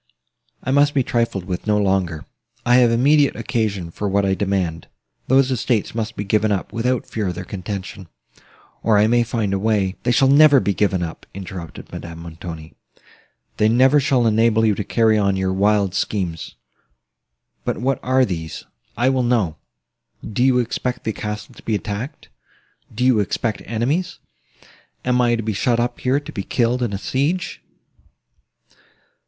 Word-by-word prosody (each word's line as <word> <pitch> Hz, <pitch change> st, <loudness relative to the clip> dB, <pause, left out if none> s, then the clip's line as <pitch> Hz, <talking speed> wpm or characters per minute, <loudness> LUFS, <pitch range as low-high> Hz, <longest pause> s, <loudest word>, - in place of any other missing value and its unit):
I 130 Hz, -, -1 dB
must 145 Hz, +1 st, +3 dB
be 135 Hz, -, +3 dB
trifled 115 Hz, -7 st, -1 dB
with 90 Hz, +2 st, -5 dB
no 105 Hz, -1 st, +3 dB
longer. 95 Hz, -6 st, 0 dB, 0.4 s
I 125 Hz, 0 st, +5 dB
have 125 Hz, -2 st, +5 dB
immediate 140 Hz, +5 st, +3 dB
occasion 100 Hz, -8 st, -2 dB
for 105 Hz, +4 st, -3 dB
what 100 Hz, +1 st, +2 dB
I 95 Hz, -, +2 dB
demand—those 100 Hz, +8 st, -1 dB
estates 120 Hz, -3 st, 0 dB
must 115 Hz, 0 st, -3 dB
be 100 Hz, -, -3 dB
given 105 Hz, +1 st, +1 dB
up, 100 Hz, -3 st, -2 dB
without 125 Hz, +2 st, 0 dB
further 95 Hz, -4 st, -3 dB
contention; 95 Hz, 0 st, -6 dB, 0.7 s
or 110 Hz, -2 st, +3 dB
I 105 Hz, -, +5 dB
may 120 Hz, +2 st, +3 dB
find 115 Hz, -4 st, -1 dB
a 100 Hz, -, 0 dB
way—" 100 Hz, -2 st, 0 dB
"They 120 Hz, -, +1 dB, 0.2 s
never 145 Hz, +2 st, +7 dB
shall -, -, +6 dB
be 100 Hz, -, 0 dB
given 95 Hz, -3 st, +1 dB
up," 80 Hz, -1 st, -7 dB
interrupted 95 Hz, -4 st, -8 dB
Madame 85 Hz, -1 st, -7 dB
Montoni: 80 Hz, -1 st, -9 dB, 0.8 s
"they 105 Hz, -, +3 dB
never 130 Hz, +5 st, +5 dB
shall 130 Hz, -3 st, +2 dB
enable 110 Hz, 0 st, +3 dB
you 110 Hz, -, +3 dB
to 105 Hz, -, -3 dB
carry 110 Hz, +1 st, +2 dB
on 100 Hz, -1 st, +2 dB
your 95 Hz, 0 st, 0 dB
wild 100 Hz, -1 st, +2 dB
schemes;—but 65 Hz, -, -6 dB
what 135 Hz, +2 st, 0 dB
are 130 Hz, 0 st, +3 dB
these? 80 Hz, -6 st, -5 dB, 0.3 s
I 120 Hz, +3 st, +2 dB
will 130 Hz, -1 st, +1 dB
know. 115 Hz, -10 st, +1 dB, 0.7 s
Do 115 Hz, +3 st, -1 dB
you 130 Hz, -1 st, +4 dB
expect 125 Hz, +1 st, -2 dB
the 110 Hz, -, -2 dB
castle 105 Hz, 0 st, -6 dB
to -, -, -15 dB
be 110 Hz, -, -1 dB
attacked? 110 Hz, +8 st, -5 dB, 0.6 s
Do 125 Hz, +3 st, -1 dB
you 125 Hz, -4 st, +4 dB
expect 105 Hz, +2 st, -1 dB
enemies? 125 Hz, -, -1 dB, 0.9 s
Am 125 Hz, 0 st, +2 dB
I 120 Hz, -1 st, +3 dB
to 115 Hz, -, -3 dB
be 110 Hz, 0 st, -2 dB
shut 120 Hz, +4 st, +1 dB
up 120 Hz, 0 st, -1 dB
here, 130 Hz, +2 st, +1 dB
to 145 Hz, -, -10 dB
be 100 Hz, -, -4 dB
killed 120 Hz, +4 st, 0 dB
in 120 Hz, -4 st, 0 dB
a 100 Hz, -, -2 dB
siege?" 150 Hz, -, -2 dB
110 Hz, 165 wpm, -21 LUFS, 95-125 Hz, 0.9 s, never